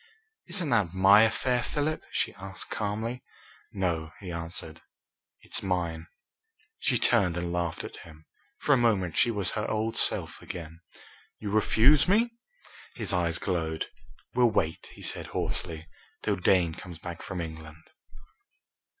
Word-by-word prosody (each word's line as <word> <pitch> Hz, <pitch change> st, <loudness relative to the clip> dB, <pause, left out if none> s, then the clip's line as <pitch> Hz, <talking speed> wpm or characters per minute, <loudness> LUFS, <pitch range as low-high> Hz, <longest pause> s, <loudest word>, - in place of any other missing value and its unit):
"Isn't 175 Hz, -5 st, 0 dB
that 100 Hz, -7 st, +2 dB
my 100 Hz, +3 st, +7 dB
affair, 120 Hz, +2 st, +2 dB
Philip?" 150 Hz, +5 st, -1 dB
she -, -, 0 dB
asked 95 Hz, +1 st, -8 dB
calmly. 110 Hz, +4 st, -2 dB, 0.5 s
"No," 85 Hz, -5 st, -1 dB
he 95 Hz, -3 st, -7 dB
answered, 85 Hz, -1 st, -5 dB, 0.6 s
"it's -, -, -2 dB
mine!" 85 Hz, -3 st, -2 dB, 0.7 s
She 125 Hz, -, +3 dB
turned 100 Hz, -8 st, +3 dB
and 85 Hz, 0 st, -2 dB
laughed 85 Hz, -2 st, -2 dB
at -, -, -8 dB
him. 80 Hz, -1 st, -14 dB, 0.3 s
For 145 Hz, -, +3 dB
a -, -, +5 dB
moment 105 Hz, -8 st, +2 dB
she -, -, +4 dB
was 100 Hz, -5 st, 0 dB
her 105 Hz, -, -2 dB
old 110 Hz, +1 st, -1 dB
self -, -, +2 dB
again. 80 Hz, -2 st, -8 dB, 0.6 s
"You 105 Hz, -2 st, -5 dB
refuse 115 Hz, -, +5 dB
me?" 225 Hz, +5 st, +3 dB, 0.6 s
His -, -, -1 dB
eyes 85 Hz, -2 st, +1 dB
glowed. 80 Hz, -4 st, -2 dB, 0.4 s
"We'll 120 Hz, -1 st, +5 dB
wait," 80 Hz, -7 st, -1 dB
he -, -, -13 dB
said -, -, -1 dB
hoarsely, 80 Hz, -2 st, -3 dB, 0.4 s
"till -, -, +1 dB
Dane 90 Hz, -2 st, +3 dB
comes 85 Hz, 0 st, -9 dB
back 85 Hz, 0 st, -7 dB
from 95 Hz, -, -5 dB
England!" 80 Hz, -1 st, -7 dB
95 Hz, 140 wpm, -28 LUFS, 85-115 Hz, 0.7 s, my